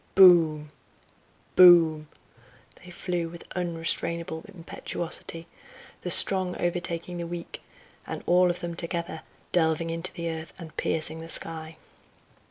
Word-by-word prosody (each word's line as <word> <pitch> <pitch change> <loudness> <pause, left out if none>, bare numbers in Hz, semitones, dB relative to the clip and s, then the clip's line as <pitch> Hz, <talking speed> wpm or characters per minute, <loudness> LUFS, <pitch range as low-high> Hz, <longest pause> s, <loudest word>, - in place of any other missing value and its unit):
boom! 160 -5 +5 0.8
boom!" 165 -4 +6 0.8
they 180 - -13
flew 175 -1 -4
with 170 0 -12
unrestrainable 170 -1 -2
impetuosity, 170 -2 -5 0.6
the 180 - -5
strong 185 0 +6
overtaking 175 0 -3
the 170 -1 -5
weak, 170 0 -8 0.5
and - - -6
all 180 +1 +3
of 175 - -4
them 175 0 -5
together 170 -1 -3 0.3
delving 165 -1 0
into 165 +2 -1
the 170 -2 -5
earth 160 -1 -6
and 165 -3 -12
piercing 160 0 -3
the 165 - -10
sky. 160 -1 -1
170 Hz, 120 wpm, -26 LUFS, 160-175 Hz, 0.8 s, boom